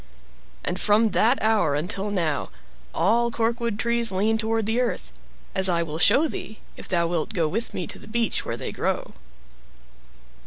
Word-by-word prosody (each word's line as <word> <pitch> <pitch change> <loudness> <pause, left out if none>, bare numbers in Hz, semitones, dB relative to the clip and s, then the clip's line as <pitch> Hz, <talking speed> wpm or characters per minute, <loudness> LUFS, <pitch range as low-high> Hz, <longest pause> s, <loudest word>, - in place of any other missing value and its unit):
And 180 +1 -2
from 215 +1 +3
that 240 +5 +3
hour 210 -10 +2
until 190 +7 -2
now, 165 -7 -1 0.4
all 235 - +2
corkwood 230 -1 -1
trees 235 0 +2
lean 215 +4 +1
toward 225 0 -1
the 225 +3 0
earth, 245 - -3 0.4
as 190 0 +5
I 170 -1 +2
will 160 -1 -5
show 270 - +5
thee, 215 -6 -7 0.2
if - - -10
thou 170 -2 +1
wilt 170 +5 -2
go 165 -4 +1
with 225 +9 -3
me 180 - -3
to - - -6
the - - -13
beach 230 +1 0
where 115 - -4
they - - -5
grow. - - -3
215 Hz, 170 wpm, -24 LUFS, 175-230 Hz, 0.4 s, as